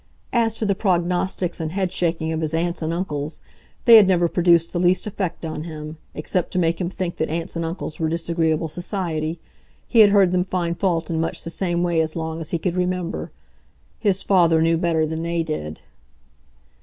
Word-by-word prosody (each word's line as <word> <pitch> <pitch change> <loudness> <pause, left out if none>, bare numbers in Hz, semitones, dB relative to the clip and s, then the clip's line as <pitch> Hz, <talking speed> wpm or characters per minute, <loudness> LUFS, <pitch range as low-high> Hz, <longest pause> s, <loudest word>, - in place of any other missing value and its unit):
As 225 -2 +2
to 220 - -1
the 200 - +2
prognostics 180 -1 0
and 160 0 -3
headshaking 175 -4 -1
of 160 0 -2
his 160 0 -1
aunts 170 +1 -1
and 160 0 -1
uncles, 155 -4 -4 0.4
they 230 -2 +10
had 205 -3 +7
never 175 -2 +3
produced 170 -1 +3
the 175 - 0
least 180 +1 +2
effect 190 -5 -4
on 155 -1 -4
him, 155 -1 -7 0.2
except 170 +3 -2
to - - -1
make 170 0 +1
him 175 - -1
think 180 -2 -4
that 160 - -1
aunts 165 +2 -4
and 165 - -2
uncles 165 -1 -5
were 160 -1 0
disagreeable 165 -1 0
society; 170 -2 -2 0.5
he 235 - +2
had 210 -2 +9
heard 200 -3 +4
them 180 0 +2
find 175 -2 -2
fault 170 -4 0
in 160 -1 0
much 165 - -3
the 165 - -3
same 175 0 -1
way 170 -2 +2
as 155 -1 -2
long 160 0 -4
as 160 - -5
he 170 - 0
could 170 +1 -2
remember. 180 -1 -2 0.7
His 200 -3 +1
father 170 -4 +4
knew 165 +1 +3
better 165 -2 +1
than 160 +1 -4
they 170 0 -1
did. 80 - -5
170 Hz, 200 wpm, -22 LUFS, 160-180 Hz, 0.7 s, they